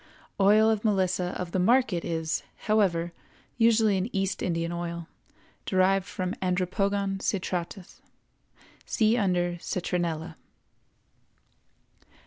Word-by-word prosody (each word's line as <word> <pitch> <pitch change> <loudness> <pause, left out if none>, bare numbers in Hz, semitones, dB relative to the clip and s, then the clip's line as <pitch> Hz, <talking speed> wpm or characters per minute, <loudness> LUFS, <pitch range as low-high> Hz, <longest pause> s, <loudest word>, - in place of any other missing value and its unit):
Oil 210 +3 +5
of 220 -2 +1
Melissa 185 -4 +1
of 180 -1 -4
the 185 - 0
market 225 -3 +3
is, 160 -1 -2 0.2
however, 175 -6 +1 0.5
usually 225 -3 +4
an 190 +5 -2
East 195 -1 -1
Indian 170 -1 -1
oil, 170 -1 -5 0.6
derived 190 0 +2
from 185 0 -3
Andropogon 195 +2 0
citratus. 185 -1 -4 0.8
See 220 +1 +2
under 180 -5 0
Citronella. 170 -2 -3
185 Hz, 100 wpm, -27 LUFS, 175-200 Hz, 0.8 s, Oil